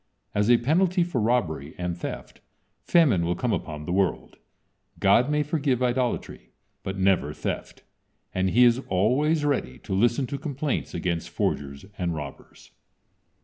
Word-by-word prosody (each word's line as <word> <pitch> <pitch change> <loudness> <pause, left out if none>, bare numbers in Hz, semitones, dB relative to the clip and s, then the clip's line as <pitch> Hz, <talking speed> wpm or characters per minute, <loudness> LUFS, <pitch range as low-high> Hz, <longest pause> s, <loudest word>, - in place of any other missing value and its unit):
As 105 +2 +1
a 120 - +7
penalty 175 +8 +2
for 170 -9 -2
robbery 85 - 0
and 90 -1 -2
theft 85 - -7 0.4
famine 140 - +3
will 85 +1 0
come 120 +4 -1
upon 75 -4 -4
the 90 - -4
world. 95 0 -1 0.6
God 115 +7 +4
may 150 0 +2
forgive 140 -4 0
idolatry, 125 0 -2 0.3
but 95 +1 -5
never 95 -6 +2
theft, - - -5 0.5
and 95 0 +1
He 120 +6 +5
is 120 0 +5
always 140 - +2
ready 130 - -1
to - - -6
listen 120 +6 +2
to 140 +2 -5
complaints 145 -1 -3
against 85 -1 -2
forgers 70 +3 -2
and 85 -2 -1
robbers. 75 -3 -9
115 Hz, 145 wpm, -25 LUFS, 90-140 Hz, 0.6 s, a